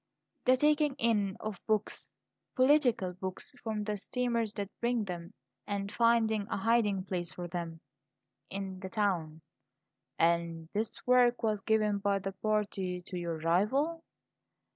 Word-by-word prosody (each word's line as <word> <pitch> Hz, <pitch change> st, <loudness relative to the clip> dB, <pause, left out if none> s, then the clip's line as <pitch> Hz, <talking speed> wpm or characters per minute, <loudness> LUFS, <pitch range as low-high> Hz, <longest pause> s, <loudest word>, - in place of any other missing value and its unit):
"The 255 Hz, 0 st, +5 dB
taking 295 Hz, 0 st, +3 dB
in 210 Hz, -6 st, +1 dB
of 215 Hz, -4 st, -5 dB
books 215 Hz, -2 st, -1 dB, 0.5 s
political 255 Hz, -8 st, +4 dB
books 185 Hz, +1 st, -6 dB
from 215 Hz, -2 st, -2 dB
the 210 Hz, -1 st, -2 dB
steamers 235 Hz, -1 st, -1 dB
that 200 Hz, -2 st, -4 dB
bring 240 Hz, -1 st, +1 dB
them 175 Hz, -3 st, -6 dB, 0.4 s
and 200 Hz, -1 st, -2 dB
finding 225 Hz, -3 st, +3 dB
a -, -, -1 dB
hiding 210 Hz, -2 st, +2 dB
place 180 Hz, -3 st, -3 dB
for 175 Hz, -1 st, -5 dB
them 165 Hz, -1 st, -5 dB, 0.7 s
in 190 Hz, -1 st, -5 dB
the 190 Hz, 0 st, -6 dB
town 175 Hz, -7 st, -1 dB, 0.4 s
" -, -, -55 dB
"And 165 Hz, -1 st, +1 dB
this 215 Hz, +2 st, 0 dB, 0.2 s
work 250 Hz, -1 st, +4 dB
was 215 Hz, -2 st, +1 dB
given 215 Hz, -1 st, +2 dB
by 200 Hz, 0 st, +1 dB
the 195 Hz, 0 st, -3 dB
party 195 Hz, -3 st, -1 dB
to 185 Hz, -, -8 dB
your 170 Hz, -2 st, -2 dB
rival?" 220 Hz, -, +1 dB
205 Hz, 140 wpm, -31 LUFS, 185-230 Hz, 0.7 s, The